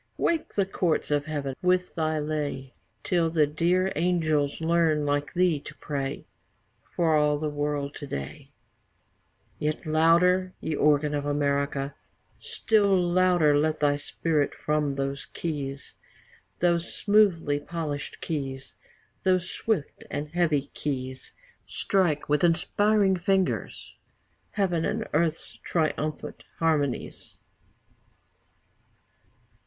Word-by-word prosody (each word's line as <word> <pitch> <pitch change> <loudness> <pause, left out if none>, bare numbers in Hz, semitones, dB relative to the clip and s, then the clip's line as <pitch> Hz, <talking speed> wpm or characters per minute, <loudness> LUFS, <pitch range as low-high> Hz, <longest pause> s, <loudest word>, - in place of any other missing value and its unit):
wake 330 -2 -1
the 200 - +2
courts 175 -5 -1
of 145 -1 +1
Heaven 145 -3 -3
with 180 0 +1
thy 155 -1 0
lay, 150 -3 -3 0.3
Till 170 -2 +1
the 160 -2 +3
dear 175 +5 +1
angels 155 -4 +1
learn 160 -2 +2
like 145 0 0
thee 175 -4 +3
to - - -11
pray 140 -2 -4 0.7
For 165 -2 +3
all 150 -1 +3
the 150 0 -2
world 145 -1 -2
to 145 - -7
day; 70 - -6 1.1
Yet 155 +3 -2
louder, 170 +4 +3
ye 160 - -3
organ 150 0 +2
of 145 0 -2
America, 140 -1 0 0.5
Still 200 -4 +2
louder, 175 -3 +3
let 155 +1 +1
thy 145 -1 +3
Spirit 150 0 -1
from 150 -2 -1
those 140 0 -3
keys, 140 -4 -5 0.7
Those 170 0 +2
smoothly 185 -9 +3
polished 150 -3 -5
keys, 135 -4 -4 0.5
Those 185 -1 +1
swift 210 -10 -2
and 150 +1 -4
heavy 155 -4 +1
keys, 130 -2 -4 0.3
Strike, 175 -7 0
with 150 +2 +1
inspiring 195 +3 +3
fingers, 190 +1 -1 0.6
Heaven 180 -5 0
and 220 +4 -2
earth's 160 +1 -1
triumphant 155 -2 -2
harmonies. 150 -5 -1
155 Hz, 110 wpm, -27 LUFS, 145-175 Hz, 1.1 s, the